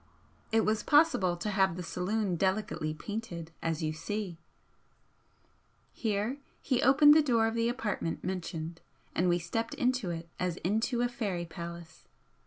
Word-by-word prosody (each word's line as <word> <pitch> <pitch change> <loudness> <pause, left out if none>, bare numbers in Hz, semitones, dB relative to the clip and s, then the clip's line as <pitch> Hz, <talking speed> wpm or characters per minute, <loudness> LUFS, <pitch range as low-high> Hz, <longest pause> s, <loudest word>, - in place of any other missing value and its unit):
It 225 0 +3
was 215 0 +1
possible 290 - +4
to 210 +4 -2
have 190 -3 +2
the 180 - -4
saloon 185 +3 -1
delicately 190 -3 0
painted, 170 -1 -6
as 165 0 -1
you 155 0 0
see," 185 +1 -4 1.5
here 220 +4 -1 0.2
he 255 -3 0
opened 295 +3 +7
the 310 - +6
door 235 -6 +3
of 225 - 0
the 230 0 +1
apartment 220 -8 -2
mentioned, 170 -2 -4 0.3
and 180 +1 +2
we 175 - +3
stepped 225 +7 -3
into 250 -6 0
it 165 0 -4
as 180 -1 -1
into 225 +6 +1
a - - +3
fairy 205 -8 -3
palace. 170 -1 -9
200 Hz, 150 wpm, -31 LUFS, 170-230 Hz, 1.5 s, opened